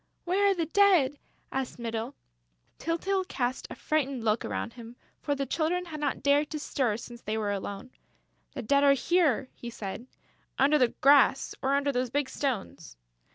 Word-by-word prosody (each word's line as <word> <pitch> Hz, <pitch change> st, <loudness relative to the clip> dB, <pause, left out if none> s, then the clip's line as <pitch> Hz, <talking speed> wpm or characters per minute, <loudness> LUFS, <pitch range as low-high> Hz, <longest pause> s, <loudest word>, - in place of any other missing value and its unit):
"Where 395 Hz, +3 st, +2 dB
are 395 Hz, -, +2 dB
the 335 Hz, -2 st, -1 dB
Dead?" 335 Hz, -6 st, +4 dB, 0.3 s
asked 265 Hz, -1 st, -3 dB
Mytyl. 230 Hz, +2 st, -4 dB, 0.6 s
Tyltyl 375 Hz, +4 st, -1 dB
cast 250 Hz, -4 st, -2 dB
a -, -, -7 dB
frightened 275 Hz, -6 st, -1 dB
look 220 Hz, 0 st, +1 dB
around 230 Hz, -, -4 dB
him, 235 Hz, -1 st, -11 dB, 0.3 s
for 285 Hz, -, -1 dB
the 275 Hz, 0 st, -2 dB
Children 340 Hz, +6 st, -1 dB
had 310 Hz, -3 st, -7 dB
not 290 Hz, -1 st, -2 dB
dared 285 Hz, +1 st, +3 dB
to 305 Hz, -, -4 dB
stir 255 Hz, -7 st, -1 dB
since 235 Hz, 0 st, -10 dB
they 215 Hz, +1 st, -3 dB
were 210 Hz, -2 st, -1 dB
alone: 200 Hz, +4 st, -5 dB, 0.6 s
"The -, -, -4 dB
Dead 280 Hz, +5 st, +3 dB
are 280 Hz, -1 st, +7 dB
here," 290 Hz, -2 st, +2 dB
he 240 Hz, -, -8 dB
said, 225 Hz, +1 st, -7 dB, 0.5 s
"under 290 Hz, +3 st, +4 dB
the 250 Hz, -, +5 dB
grass 275 Hz, -1 st, +5 dB
or 270 Hz, +1 st, +2 dB
under 280 Hz, 0 st, +1 dB
those 250 Hz, -1 st, -1 dB
big 285 Hz, +2 st, -1 dB
stones." 195 Hz, -, -4 dB
275 Hz, 175 wpm, -28 LUFS, 235-305 Hz, 0.6 s, are